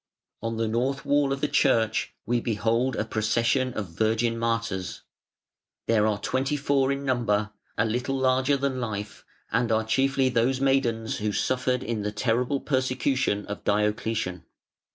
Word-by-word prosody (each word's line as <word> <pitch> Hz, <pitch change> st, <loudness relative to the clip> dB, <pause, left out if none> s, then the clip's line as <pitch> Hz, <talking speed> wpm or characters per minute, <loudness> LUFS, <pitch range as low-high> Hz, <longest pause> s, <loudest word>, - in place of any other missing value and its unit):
On 115 Hz, 0 st, -3 dB
the 115 Hz, 0 st, 0 dB
north 125 Hz, +5 st, -1 dB
wall 145 Hz, -1 st, +2 dB
of 135 Hz, 0 st, -2 dB
the 150 Hz, -, +2 dB
church 115 Hz, -6 st, +2 dB
we 120 Hz, +1 st, +1 dB
behold 115 Hz, +4 st, 0 dB
a 105 Hz, -, -1 dB
procession 115 Hz, +4 st, +1 dB
of 100 Hz, -5 st, -3 dB
Virgin 115 Hz, +3 st, +1 dB
Martyrs. 115 Hz, -5 st, -2 dB, 0.8 s
They 115 Hz, -, +2 dB
are 105 Hz, -1 st, +2 dB
twenty 135 Hz, +6 st, -1 dB
four 140 Hz, -2 st, +2 dB
in 140 Hz, 0 st, -3 dB
number, 110 Hz, -5 st, +1 dB, 0.3 s
a 105 Hz, -, +3 dB
little 125 Hz, +4 st, -1 dB
larger 130 Hz, +2 st, +2 dB
than 135 Hz, -2 st, -1 dB
life, 105 Hz, -3 st, -5 dB, 0.3 s
and 115 Hz, +1 st, +1 dB
are 110 Hz, 0 st, +2 dB
chiefly 135 Hz, +3 st, +2 dB
those 125 Hz, +2 st, +1 dB
maidens 125 Hz, -5 st, +1 dB
who 105 Hz, 0 st, -1 dB
suffered 125 Hz, +3 st, 0 dB
in 115 Hz, -2 st, -2 dB
the 105 Hz, 0 st, -2 dB
terrible 125 Hz, +5 st, 0 dB
persecution 130 Hz, -5 st, 0 dB
of 105 Hz, -, -6 dB
Diocletian. 105 Hz, -3 st, 0 dB
115 Hz, 155 wpm, -26 LUFS, 110-130 Hz, 0.8 s, a